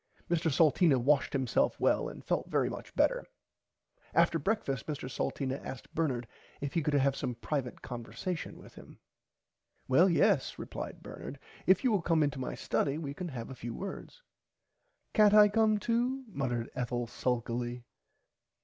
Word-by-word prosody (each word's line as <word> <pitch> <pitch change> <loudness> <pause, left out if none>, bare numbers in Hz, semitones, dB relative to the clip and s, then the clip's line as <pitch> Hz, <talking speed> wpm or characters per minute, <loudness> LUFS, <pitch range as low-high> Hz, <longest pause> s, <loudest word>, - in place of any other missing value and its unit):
Mr 165 -1 +2
Salteena 155 0 +4
washed 140 +3 +3
himself 130 -3 +1
well - - +2
and - - -11
felt - - -1
very - - +2
much - - -9
better. - - +2 0.9
After 170 0 +4
brekfast 140 - -1
Mr 150 -4 -4
Salteena 135 +1 -3
asked 130 - -8
Bernard 130 -7 -1 0.3
if 140 -1 -4
he 170 - +2
could 150 -1 0
have 140 -1 +3
some 125 -3 -3
privite 125 +2 -3
conversation 120 - -5
with - - -14
him. - - -14 0.9
Well 165 +9 +5
yes 170 - +3
replied - - -6
Bernard - - -8 0.3
if 190 +5 +5
you 255 - +3
will 205 -4 +2
come 165 -2 +3
into 145 -2 -1
my 130 - -3
study 140 0 0
we 145 -3 -4
can 180 +4 -5
have 130 -5 -6
a - - -7
few 120 -1 -6
words. 200 - -7 0.9
Cant 210 -2 +6
I 210 -1 +8
come 215 0 +3
too 240 +5 0
muttered 125 - -2
Ethel 120 -1 -2
sulkily. 120 0 -2
145 Hz, 160 wpm, -31 LUFS, 125-180 Hz, 0.9 s, I